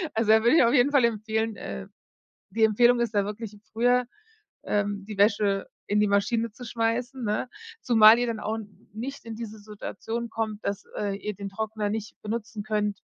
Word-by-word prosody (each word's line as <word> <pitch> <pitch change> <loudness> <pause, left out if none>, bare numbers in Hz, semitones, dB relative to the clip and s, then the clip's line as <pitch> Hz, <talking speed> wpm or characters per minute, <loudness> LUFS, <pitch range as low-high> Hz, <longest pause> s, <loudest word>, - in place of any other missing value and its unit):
Also, 220 -1 +1
da 220 0 +5
würde 235 +5 +5
ich - - +7
auf 235 +1 +3
jeden 270 0 +4
Fall 280 -4 +5
empfehlen 220 0 -1
äh, 65 -1 -6 0.6
die 225 -1 +2
Empfehlung 240 +3 +4
ist 235 -2 -1
da 200 -1 +3
wirklich, 210 0 -6
früher, 245 +2 +3 0.6
ähm, 205 -1 -1
die 210 -2 -8
Wäsche 200 -1 +2 0.2
in 210 +1 +2
die 210 - +4
Maschine 225 +3 +1
zu 245 - -10
schmeißen, 235 +2 -2
ne? 210 +4 -1 0.3
Zumal 225 -1 +7
ihr 245 - +1
dann 225 -2 -3
auch 220 +1 -2 0.4
nicht 255 +5 -6
in 225 - -5
diese 220 -1 -7
Situation 215 +2 -6
kommt, 220 -2 -4
dass, 200 0 -3
äh, 200 -1 -2
ihr 210 +1 -5
den 200 +1 -6
Trockner 215 +1 -3
nicht 220 0 -5
benutzen 215 -1 -4
könnt, 210 -2 -1
220 Hz, 185 wpm, -26 LUFS, 210-235 Hz, 0.6 s, ich